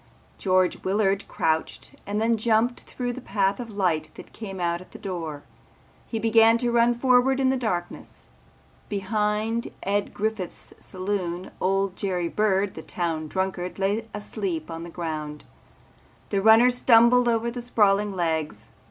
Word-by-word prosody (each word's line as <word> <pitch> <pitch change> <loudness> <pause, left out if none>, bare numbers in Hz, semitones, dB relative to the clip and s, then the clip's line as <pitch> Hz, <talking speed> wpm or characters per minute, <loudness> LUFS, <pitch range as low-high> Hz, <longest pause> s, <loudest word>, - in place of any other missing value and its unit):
George 185 -1 +2
Willard 195 0 +1
crouched 160 0 -1 0.2
and 205 +1 -1
then 230 +1 +2
jumped 225 +2 +1
through 245 -1 -5
the 260 - -8
path 195 -2 0
of 240 -2 -6
light 180 -7 0
that - - -12
came 195 -4 -7
out 170 0 -1
at 185 - -16
the - - -8
door. 165 -6 -5 0.6
He 230 - -3
began 225 +1 +5
to 240 0 0
run 235 0 +3
forward 255 +2 +3
in 265 -1 +3
the - - +1
darkness. 185 -9 -4 0.6
Behind 210 +3 -1 0.2
Ed 200 +1 0
Griffith's 215 -3 -4
saloon 185 -2 -4
old 195 0 +1
Jerry 180 -4 -2
Bird 205 -1 +1
the 160 - -8
town 160 -2 -3
drunkard 190 +1 -3
lay 205 +3 -1
asleep 195 -6 -4
on 165 0 -6
the 170 - -7
ground. 155 -3 -5 0.9
The 200 -2 0
runner 225 +4 +7
stumbled 245 0 +5
over 230 0 0
the 245 0 -5
sprawling 210 -4 +2
legs. 160 - -2
200 Hz, 150 wpm, -25 LUFS, 180-225 Hz, 0.9 s, runner